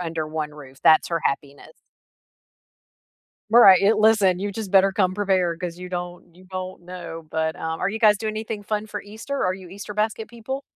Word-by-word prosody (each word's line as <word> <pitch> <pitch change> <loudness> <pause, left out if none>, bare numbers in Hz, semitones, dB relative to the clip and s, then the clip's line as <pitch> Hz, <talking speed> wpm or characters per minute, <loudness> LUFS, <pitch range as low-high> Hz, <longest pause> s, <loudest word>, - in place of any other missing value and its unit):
under 165 -2 -3
one 155 -1 -3
roof, 135 -2 -13
that's 160 - +6
her 170 -1 -1
happiness. 140 0 -3 1.8
Well, 235 +2 +7
right, 190 -1 +8
i 205 - +5
listen, 215 -4 +3
you 200 +1 -3
just 205 -2 -6
better 195 0 +5
come 185 -1 +1
prepared 185 -4 0
'cause 175 -1 -5
you 180 0 -8
don't 175 -1 -6
you 185 +1 -17
don't 185 -1 -6
know, 175 -2 -8
but, 160 0 -1
um, 160 0 -4
are 180 - 0
you 220 +2 -4
guys 210 -3 +5
doing 215 0 -3
anything 215 -1 -5
fun 215 +1 -3
for 205 -1 -6
Easter? 220 +7 -5
Are 185 - +1
you 185 -1 -10
Easter 200 +3 -8
basket 220 +1 -2
people? 245 +3 -6
185 Hz, 200 wpm, -23 LUFS, 170-215 Hz, 1.8 s, right